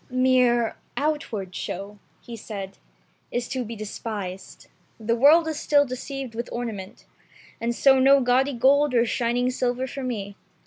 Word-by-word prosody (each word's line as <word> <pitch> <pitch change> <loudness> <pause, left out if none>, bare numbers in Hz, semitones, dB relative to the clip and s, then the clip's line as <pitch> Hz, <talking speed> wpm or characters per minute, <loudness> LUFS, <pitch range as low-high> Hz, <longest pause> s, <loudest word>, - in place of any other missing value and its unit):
*'Mere 250 -2 +2 0.2
outward 280 -11 -2
show," 200 +3 -6 0.2
he 235 - -9
said, 200 -3 -8 0.5
"is 245 0 -2
to 260 -1 -3
be 230 0 -7
despised. 205 -3 -6 0.3
The 230 +1 0
world 305 +7 +6
is 310 -2 -3
still 285 -1 +3
deceived 260 -1 -6
with 235 +2 -5
ornament, 220 -6 -6 0.6
and 235 +1 -1
so 265 +1 +5
no 275 +1 +6
gaudy 260 +2 +2
gold 275 +2 +3
or 235 0 +4
shining 245 +2 0
silver 250 0 -1
for 270 +1 -6
me. 205 -6 -4
245 Hz, 145 wpm, -24 LUFS, 225-265 Hz, 0.6 s, world